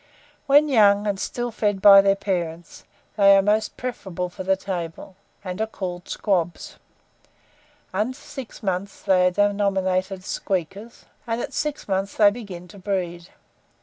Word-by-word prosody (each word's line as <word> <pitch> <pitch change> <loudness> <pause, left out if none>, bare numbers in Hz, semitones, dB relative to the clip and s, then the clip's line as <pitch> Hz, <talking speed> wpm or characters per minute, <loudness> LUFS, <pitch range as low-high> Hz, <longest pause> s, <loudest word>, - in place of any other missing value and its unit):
When 290 +2 +6
young, 205 -6 +4
and 200 -2 -1
still 240 +3 -3
fed 205 -3 -1
by 195 0 +9
their 195 0 +3
parents, 175 -4 -4 0.3
they 200 -1 +7
are - - +5
most 215 +2 0
preferable 190 -8 -4
for 175 - -9
the 190 +1 +2
table, 180 -1 -6 0.3
and 185 +1 -5
are 220 - 0
called 180 -4 -6
squabs; 175 -5 -2 1.2
under 215 +7 -1
six 260 -4 -10
months 195 0 -3
they 185 -2 +4
are - - +4
denominated 195 -1 0
squeakers, 195 +4 -4 0.2
and 230 0 -1
at - - -5
six 300 -1 -3
months 195 0 -2
they 205 -2 +6
begin 195 -6 -9
to 200 - -13
breed. 180 -3 -3
195 Hz, 150 wpm, -23 LUFS, 185-210 Hz, 1.2 s, by